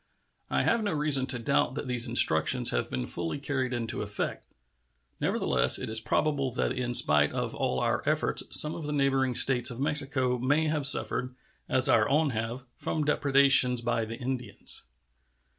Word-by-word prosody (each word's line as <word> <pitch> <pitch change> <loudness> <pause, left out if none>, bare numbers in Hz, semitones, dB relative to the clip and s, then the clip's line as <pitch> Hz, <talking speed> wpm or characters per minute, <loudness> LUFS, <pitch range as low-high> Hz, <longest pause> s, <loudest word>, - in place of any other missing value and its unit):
I - - 0
have 235 - +1
no 205 - -2
reason 145 -3 0
to 130 - 0
doubt 130 +2 -1
that 145 - -5
these 125 -1 +1
instructions 120 +1 +3
have - - -2
been 65 -1 -4
fully 85 - -4
carried 140 -2 -3
into 120 -2 -3
effect; 105 0 -5 0.7
nevertheless, 65 -2 0
it - - -6
is 110 - +2
probable 140 +1 -1
that - - -1
in 125 -1 -2
spite 75 -6 +4
of - - -4
all 65 - -2
our - - -1
efforts - - 0
some 150 +1 +6
of 160 - -7
the 150 - -3
neighboring 135 -3 0
States 125 -1 +4
of 120 -1 -8
Mexico 135 -4 -1
may 145 +6 0
have 150 -2 0
suffered, 125 -2 0 0.3
as 130 - +3
our 110 -2 +2
own 150 0 +1
have, 115 +2 -5
from 155 - -3
depredations 140 -4 +4
by 115 -1 -1
the 115 +1 -7
Indians. 125 -1 -5
130 Hz, 175 wpm, -27 LUFS, 115-140 Hz, 0.7 s, some